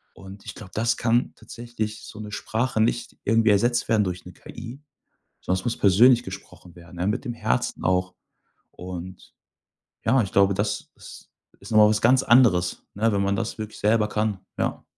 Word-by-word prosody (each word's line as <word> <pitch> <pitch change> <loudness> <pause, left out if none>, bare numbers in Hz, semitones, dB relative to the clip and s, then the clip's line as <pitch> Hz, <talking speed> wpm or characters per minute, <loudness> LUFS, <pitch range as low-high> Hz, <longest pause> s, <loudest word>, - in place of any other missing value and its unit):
und 95 +1 -12
ich - - -8
glaube, 95 -3 -11
das 115 +2 0
kann 120 +1 +1
tatsächlich 115 -3 -6
so 105 - -11
'ne 105 -1 -7
Sprache 110 +2 -1
nicht 110 - -1
irgendwie 115 0 +3
ersetzt 120 +4 +2
werden 110 -2 +3
durch 90 -2 -5
'ne 90 - -11
KI, 125 - -10 0.6
sondern 95 0 -1
es - - -12
muss 120 - -1
persönlich 120 +5 +5
gesprochen 90 -6 -11
werden, 85 0 -14
ne, 90 - -2
mit 115 +6 -2
dem 120 - -3
Herzen 60 - -2
auch. 90 0 0 0.6
Und, 90 0 -9 0.7
ja, 130 +3 +4
ich 100 - -6
glaube, 100 0 +4
das 105 +2 -3
ist - - -14 0.3
ist - - -11
noch 110 - +3
mal 105 - +8
was 105 -1 0
ganz 130 +3 +5
anderes, 110 -9 +3
ne, 110 +3 +1
wenn 100 - +1
man 100 0 +1
das 115 0 -3
wirklich 110 -1 -7
selber 105 0 +2
kann, 105 -2 -1 0.2
ja. - - -2
105 Hz, 190 wpm, -24 LUFS, 95-115 Hz, 0.7 s, mal